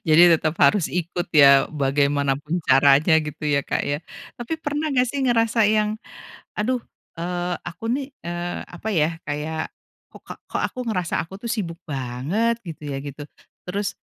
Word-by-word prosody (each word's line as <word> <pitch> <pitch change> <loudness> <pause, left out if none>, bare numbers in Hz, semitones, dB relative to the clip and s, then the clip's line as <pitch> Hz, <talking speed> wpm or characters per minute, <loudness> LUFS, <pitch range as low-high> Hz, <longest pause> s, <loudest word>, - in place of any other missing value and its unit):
Jadi 155 +2 +7
tetap 155 0 +1
harus 205 -6 +4
ikut 175 0 -2
ya, 140 -3 +7
bagaimana 140 -1 +1
pun 155 +4 -3
caranya 140 +4 +5
gitu 150 0 -7
ya, 140 -1 +2
Kak, - - -1
ya? 145 +1 0 0.4
Tapi 240 +6 -5
pernah 300 0 -2
nggak 250 -2 +3
sih 280 +3 -3
ngerasa 230 -3 +3
yang, 215 0 +2 0.6
"Aduh, 245 +4 0 0.4
eee, 175 +1 -2
aku 175 +5 -8
nih, 270 +2 -1 0.2
eee, 175 +1 -3
apa 175 +5 -7
ya, 165 -1 +1
kayak 155 +2 -3 0.4
kokak - - -11
kok - - -3
aku - - -14
ngerasa 180 -6 -1
aku 190 +3 -11
tuh 235 - -5
sibuk 175 -8 -3
banget?" 145 - -1
Gitu 165 -4 -9
ya - - -3
gitu, 145 +1 -7 0.4
terus 200 +2 -3
170 Hz, 160 wpm, -23 LUFS, 145-215 Hz, 0.6 s, Jadi